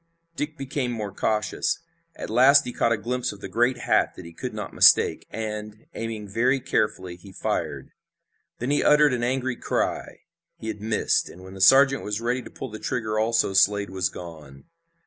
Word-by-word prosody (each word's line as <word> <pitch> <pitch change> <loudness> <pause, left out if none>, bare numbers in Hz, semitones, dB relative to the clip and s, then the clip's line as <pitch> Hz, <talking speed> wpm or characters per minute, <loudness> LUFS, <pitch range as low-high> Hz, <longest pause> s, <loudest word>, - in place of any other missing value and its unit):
Dick 150 0 -4
became 135 -1 -3
more 105 -4 -5
cautious. 105 +1 -1 0.4
At - - -7
last 135 +5 +6
he 125 - -5
caught 115 - +1
a 115 - +2
glimpse 125 +3 -2
of 105 - -12
the - - -7
great 120 +2 +1
hat 125 - +1
that 90 - -10
he 85 - -11
could - - -5
not - - -6
mistake, - - +5
and, 105 -1 -6
aiming 110 -2 -5
very 125 +7 +1
carefully, 95 -7 -2
he 95 +2 -14
fired. - - -3 0.7
Then 125 +4 -3
he 145 - +2
uttered 150 -2 +5
an 125 - -1
angry 130 +1 -1
cry. - - -3 0.4
He 110 - -6
had 105 -2 -6
missed, 110 0 0
and 90 - -13
when 95 0 -11
the 95 - -8
sergeant 135 +5 +6
was 105 0 -3
ready 120 +2 -1
to - - -11
pull 130 - -8
the 110 - -7
trigger 110 -2 -2
also 110 -2 +1
Slade 100 0 +3
was 95 -1 -1
gone. 75 -7 -11
110 Hz, 190 wpm, -25 LUFS, 100-125 Hz, 0.7 s, last